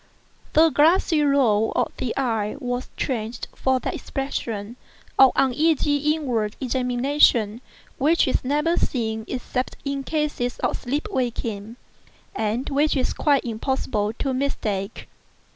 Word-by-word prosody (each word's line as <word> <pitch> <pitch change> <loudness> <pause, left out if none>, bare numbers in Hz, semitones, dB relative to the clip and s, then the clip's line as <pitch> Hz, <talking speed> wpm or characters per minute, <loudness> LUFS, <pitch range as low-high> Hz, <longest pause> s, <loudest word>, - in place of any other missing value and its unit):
The 325 +1 +6
glassy 320 +2 +4
roll 250 -7 +3
of - - 0
the 245 - -3
eye 225 -6 0
was 245 -2 -3
changed 230 -2 -3
for 260 -1 +1
that - - -3
expression 230 -5 -4 0.4
of 265 -1 +8
uneasy 290 +2 +2 0.2
inward 235 -9 -2
examination 250 -3 +2 0.4
which 310 +4 +3
is 260 - 0
never 300 +6 +1
seen 220 -3 -1
except 255 0 -3
in 275 0 -2
cases 295 -5 -2
of - - +1
sleep 285 - -3
waking, 230 - -3 0.6
and 225 - -1
which 295 +2 +2
it - - +2
is - - -1
quite 285 -3 +2
impossible 220 -2 -1
to 270 +3 -2
mistake. 220 -7 -2
255 Hz, 125 wpm, -23 LUFS, 225-285 Hz, 0.6 s, of